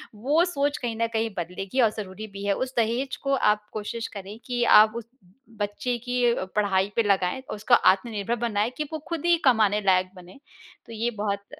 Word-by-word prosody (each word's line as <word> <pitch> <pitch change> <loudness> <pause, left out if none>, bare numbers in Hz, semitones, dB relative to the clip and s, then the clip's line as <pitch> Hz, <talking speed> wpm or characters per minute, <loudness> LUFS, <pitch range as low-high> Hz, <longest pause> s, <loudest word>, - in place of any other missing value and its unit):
वो 285 +10 +2
सोच 290 -4 -1
कहीं 235 -3 -4
न 230 - +2
कहीं 225 0 0
बदलेगी 185 +8 -2
और 225 - +5
ज़रूरी 205 +1 -6
भी 200 -1 -9
है, 200 - +2
उस 260 +5 -3
दहेज 235 +4 0
को 275 0 0
आप 210 -3 +1
कोशिश 220 +2 -4
करें 200 +1 -8
कि 245 -1 -1
आप 215 -1 +7
उस 235 -1 -6 0.5
बच्चे 205 +4 -2
की 245 -1 +2 0.2
पढ़ाई 200 -1 +1
पे 230 - +3
लगाएँ, 195 +3 +1
उसको 215 +4 -1
आत्मनिर्भर 215 +2 +1
बनाएँ 210 +1 0
कि 305 - -1
वो 315 - -3
खुद 335 -2 -4
ही 345 -1 +4
कमाने 215 -4 +4
लायक 185 -1 +3
बने। 180 +6 -14 0.5
तो 230 - -11
ये 230 +2 -1
बहुत 200 -1 -2
220 Hz, 190 wpm, -25 LUFS, 200-245 Hz, 0.5 s, आप